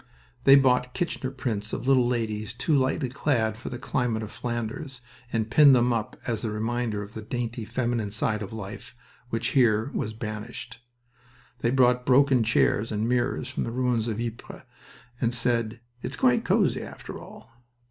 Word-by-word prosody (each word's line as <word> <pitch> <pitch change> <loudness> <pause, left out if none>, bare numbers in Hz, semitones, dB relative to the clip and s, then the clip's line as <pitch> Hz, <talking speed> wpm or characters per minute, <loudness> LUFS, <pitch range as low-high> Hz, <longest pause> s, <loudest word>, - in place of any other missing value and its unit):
They 135 - +9
bought 125 -2 +3
Kirchner 165 -6 -2
prints 115 -6 -4
of 125 - -3
little 130 -3 +5
ladies 110 -2 -2
too 155 +5 +1
lightly 135 +1 +1
clad 120 -4 0
for - - -7
the 125 - -5
climate 120 -3 -1
of 110 - -7
Flanders, 120 +3 -4 0.3
and 110 -1 -1
pinned 140 +1 +8
them 120 0 +3
up 115 -2 -2
as 115 -3 -2
a 115 - -1
reminder 110 0 -2
of 105 +1 -11
the 110 - -6
dainty 115 0 -4
feminine 120 -2 -1
side 105 +1 -1
of 100 - -6
life 110 +3 -8 0.3
which 115 +1 -1
here 120 -2 +3
was 110 -5 -2
banished. 110 +2 -6 0.8
They 120 - +1
brought 125 -1 +3
broken 130 -1 +5
chairs 115 0 +2
and 110 +1 -1
mirrors 125 +1 0
from - - -2
the - - -3
ruins 120 -2 0
of 110 -1 -2
Ypres, 115 -1 -6 0.6
and 120 0 +1
said, 115 -1 0 0.2
"It's 125 +2 -3
quite 125 -1 +3
cozy, - - +2
after - - -8
all!" 115 - -13
120 Hz, 170 wpm, -26 LUFS, 110-125 Hz, 0.8 s, They